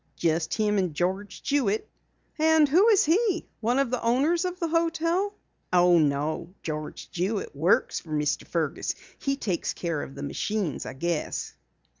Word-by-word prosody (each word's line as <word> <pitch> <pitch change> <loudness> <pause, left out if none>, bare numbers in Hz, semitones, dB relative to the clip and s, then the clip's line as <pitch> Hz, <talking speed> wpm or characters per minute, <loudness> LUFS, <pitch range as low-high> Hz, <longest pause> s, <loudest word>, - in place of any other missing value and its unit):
"Just 160 -1 0
him 210 -2 +2
and 180 -5 -1
George 190 +5 -2
Jewitt." 240 -7 +1 0.5
"And 315 -1 +5
who 355 +10 +5
is 420 -2 +5
he? 365 +2 +2
One 240 +3 +1
of 275 -3 +1
the 250 - -1
owners 290 +10 +2
of 360 0 -3
the 335 - 0
hotel?" 335 +4 +1 0.4
"Oh, 175 -1 +5
no. 155 +4 -1
George 155 -1 -5
Jewitt 190 0 -2
works 165 +7 +2
for 160 - -16
Mr. 150 -1 -1
Fergus. 160 -4 -1 0.2
He 275 -1 0
takes 195 -10 -2
care 170 -4 -2
of 135 - -8
the 140 - -6
machines, 190 +4 -2
I - - -5
guess." 165 +3 -2
205 Hz, 160 wpm, -27 LUFS, -, 0.5 s, And